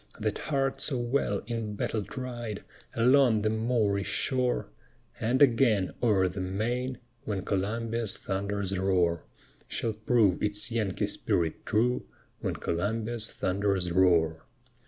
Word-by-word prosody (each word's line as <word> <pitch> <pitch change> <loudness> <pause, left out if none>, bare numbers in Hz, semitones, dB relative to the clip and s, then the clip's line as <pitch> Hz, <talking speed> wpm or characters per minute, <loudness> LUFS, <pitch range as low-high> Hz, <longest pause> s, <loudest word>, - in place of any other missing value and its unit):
That 110 -1 -1
heart 135 -2 -1
so 135 - -1
well 120 -4 0
in 115 -2 -3
battle 110 +2 -1
tried, 120 -4 -5 0.3
Along 120 -2 +4
the 110 - +2
Moorish 110 -4 +1
shore, 125 -1 0 0.5
And 125 +5 +3
again 115 -7 +3
o'er 105 -6 +3
the 90 +1 -4
main, 120 +7 -2 0.3
When 100 -5 -3
Columbia's 115 +3 -1
thunders 100 0 -2
roar, 90 -4 +1 0.4
Shall 115 - -1
prove 110 -3 +2
its 105 +2 -1
Yankee 110 -5 0
spirit 80 -2 -1
true, 120 +4 +1 0.3
When - - -2
Columbia's 110 +5 -2
thunders 95 -2 0
roar. 85 -3 +3
110 Hz, 120 wpm, -29 LUFS, 95-120 Hz, 0.5 s, Along